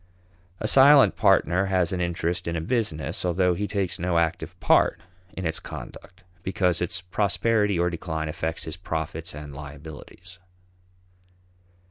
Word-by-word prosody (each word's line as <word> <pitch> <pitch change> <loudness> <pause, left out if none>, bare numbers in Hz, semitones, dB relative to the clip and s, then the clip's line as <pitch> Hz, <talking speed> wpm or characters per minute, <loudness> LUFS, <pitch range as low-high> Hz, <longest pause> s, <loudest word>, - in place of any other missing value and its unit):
A 110 - -2
silent 135 +3 +7
partner 90 +4 +3
has 95 -3 +1
an 90 -1 -2
interest 85 0 -2
in 85 - -2
a - - -1
business, 85 - -2
although 90 0 +2
he 100 +4 -3
takes 95 -5 -2
no 85 0 0
active 85 0 -1
part 85 - +3 0.3
in 95 - -6
its 80 0 -1
conduct 90 +1 -10 0.2
because 90 -2 0
its 85 0 -2
prosperity 105 +2 +1
or 85 +1 +1
decline 80 -2 -4
affects 80 0 -3
his 80 +3 -6
profits 80 -2 -4
and 75 -1 -8
liabilities. 75 +6 -10
85 Hz, 140 wpm, -25 LUFS, 80-95 Hz, 0.3 s, silent